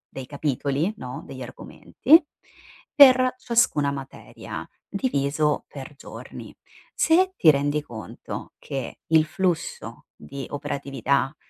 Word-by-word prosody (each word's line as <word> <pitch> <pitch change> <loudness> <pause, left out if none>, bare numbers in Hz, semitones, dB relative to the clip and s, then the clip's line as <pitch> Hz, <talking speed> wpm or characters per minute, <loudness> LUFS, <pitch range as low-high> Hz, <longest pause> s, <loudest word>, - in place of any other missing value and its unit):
dei 135 - -6
capitoli, 145 - -1
no, 125 -4 -7
degli 130 -1 -9
argomenti, 265 - +2 0.7
per 255 -3 +7
ciascuna 230 - +2
materia, 135 -1 -8 0.2
diviso 150 - 0
per 140 +1 -10
giorni. - - -10 0.4
Se 370 +3 +3
ti 160 - +6
rendi 145 +1 0
conto 110 -9 -8
che 135 -3 -6
il 160 -1 +4
flusso 170 +1 -3
di 135 - -8
operatività 140 -1 -1
145 Hz, 105 wpm, -24 LUFS, 135-190 Hz, 0.7 s, per